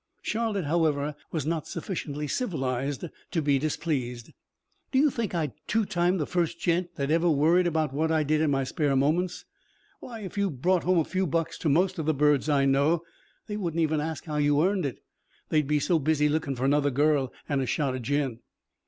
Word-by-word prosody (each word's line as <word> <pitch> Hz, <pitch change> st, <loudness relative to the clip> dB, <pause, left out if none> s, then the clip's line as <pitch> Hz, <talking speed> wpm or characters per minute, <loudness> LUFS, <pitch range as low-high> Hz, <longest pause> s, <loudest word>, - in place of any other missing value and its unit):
Charlotte, 215 Hz, -5 st, -1 dB
however, 150 Hz, -2 st, +1 dB, 0.2 s
was 155 Hz, -4 st, -2 dB
not 160 Hz, -1 st, -2 dB
sufficiently 150 Hz, -5 st, -4 dB
civilized 140 Hz, -, -2 dB, 0.2 s
to 175 Hz, -, -1 dB
be 145 Hz, -3 st, +2 dB
displeased. 130 Hz, -6 st, -2 dB, 0.6 s
"Do 265 Hz, -, +1 dB
you 290 Hz, +1 st, +4 dB
think 225 Hz, -7 st, -3 dB
I'd 155 Hz, -6 st, -1 dB
two 220 Hz, 0 st, +1 dB
time 180 Hz, -1 st, +1 dB
the 155 Hz, -, -1 dB
first 170 Hz, 0 st, -1 dB
gent 175 Hz, 0 st, 0 dB
that 140 Hz, -1 st, -2 dB
ever 170 Hz, +2 st, +3 dB
worried 165 Hz, +4 st, +4 dB
about 155 Hz, -4 st, 0 dB
what 160 Hz, +3 st, 0 dB
I 160 Hz, -1 st, +2 dB
did 155 Hz, +1 st, +1 dB
in 160 Hz, -, +2 dB
my 135 Hz, -1 st, +1 dB
spare 140 Hz, +1 st, 0 dB
moments? 165 Hz, +7 st, 0 dB, 0.5 s
Why, 230 Hz, -3 st, -8 dB
if 200 Hz, 0 st, -5 dB
you 200 Hz, -1 st, +2 dB
brought 175 Hz, +5 st, 0 dB
home 185 Hz, 0 st, +3 dB
a 165 Hz, -, +4 dB
few 190 Hz, 0 st, -1 dB
bucks 165 Hz, +2 st, -1 dB
to 160 Hz, -, 0 dB
most 180 Hz, +5 st, +2 dB
of 155 Hz, -, -3 dB
the 155 Hz, -, +2 dB
birds 150 Hz, 0 st, +3 dB
I 140 Hz, -2 st, +3 dB
know, 140 Hz, +5 st, +2 dB, 0.4 s
they 210 Hz, -, -4 dB
wouldn't 170 Hz, -5 st, -1 dB
even 155 Hz, -1 st, +1 dB
ask 160 Hz, 0 st, -4 dB
how 150 Hz, -2 st, -3 dB
you 145 Hz, +1 st, +3 dB
earned 190 Hz, -5 st, +1 dB
it 130 Hz, -, -8 dB, 0.5 s
they'd 150 Hz, -3 st, +2 dB
be 150 Hz, 0 st, +2 dB
so 165 Hz, +3 st, +2 dB
busy 150 Hz, 0 st, +2 dB
lookin' 150 Hz, -2 st, -1 dB
for 125 Hz, +2 st, -2 dB
another 145 Hz, +1 st, +3 dB
girl 145 Hz, -1 st, +2 dB, 0.2 s
an' 140 Hz, -2 st, 0 dB
a 130 Hz, -, -2 dB
shot 140 Hz, -1 st, 0 dB
of 130 Hz, -, -4 dB
gin." 135 Hz, -2 st, -1 dB
155 Hz, 205 wpm, -27 LUFS, 145-175 Hz, 0.6 s, you